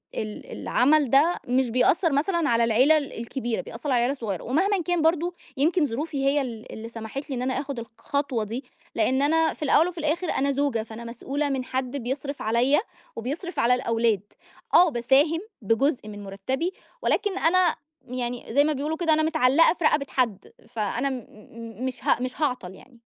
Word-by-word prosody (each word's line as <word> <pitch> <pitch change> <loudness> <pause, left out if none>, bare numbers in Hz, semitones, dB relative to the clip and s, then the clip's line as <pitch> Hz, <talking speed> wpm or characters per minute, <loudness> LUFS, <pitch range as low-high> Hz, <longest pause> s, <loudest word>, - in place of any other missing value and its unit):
ال 215 -1 -5
العمل 285 +1 +2
ده 295 +8 +4
مش 250 0 +2
بيأثِّر 310 +8 +3
مثلًا 320 +3 +1
على 235 0 +3
العيلة 250 +7 +5
الكبيرة، 240 -4 -3
بيأثِّر 240 +6 -7
على 250 - +3
العيلة 240 +2 +2
الصغيرة. 215 - -4
ومهمًا 375 - +1
كان، 350 0 0
برضو 335 +2 +2 0.2
يمكن 315 +4 +3
ظروفي 280 +2 -3
هي 285 +1 +3
ال 235 -3 -7
اللي 225 +1 -7
سمَحِت 230 +6 -7
لي 270 - -2
إن 245 - -3
أنا 260 +1 0
آخُد 280 -3 -4
الخطوة 235 +2 -3
دي، 230 +6 -5 0.3
لإن 255 +4 +2
أنا 320 +2 +3
في - - -8
الأوَّل 310 +3 +4
وفي 360 -1 -7
الآخِر 325 +3 -1
أنا 280 +1 +1
زوجة، 275 -5 0
فأنا 225 +1 -9
مسؤولة 270 +5 -3
من 265 -2 -1
حد 260 +1 -3
بيصرف 275 +3 -4
عليَّا 240 +6 +3 0.4
وبيصرف 290 - -4
على 240 +2 +4
الأولاد. 230 -4 +1 0.5
آه، 350 +1 +7
باساهم 275 +5 +3 0.2
بجُزء 230 +4 +1
من 205 -1 -8
مرتَّبي، 260 - -3 0.3
ولكن 410 -5 0
أنا 360 0 +3 0.3
يعني 245 -1 -4
زي 285 +3 +5
ما 305 +1 +1
بيقولوا 300 +3 -2
كده، 325 -2 +2
أنا 310 0 +2
متعلِّقة 315 -1 +4
في 350 - -7
رقبة 300 -2 +3
حد، 225 -7 -1 0.2
فأنا 230 +4 -1
م 255 -4 -5 0.6
مش 260 -1 -5
ه - - +3
مش 255 +4 -4
هاعطل 250 -11 -1
يعني. 245 +3 -18
270 Hz, 180 wpm, -25 LUFS, 235-310 Hz, 0.6 s, آه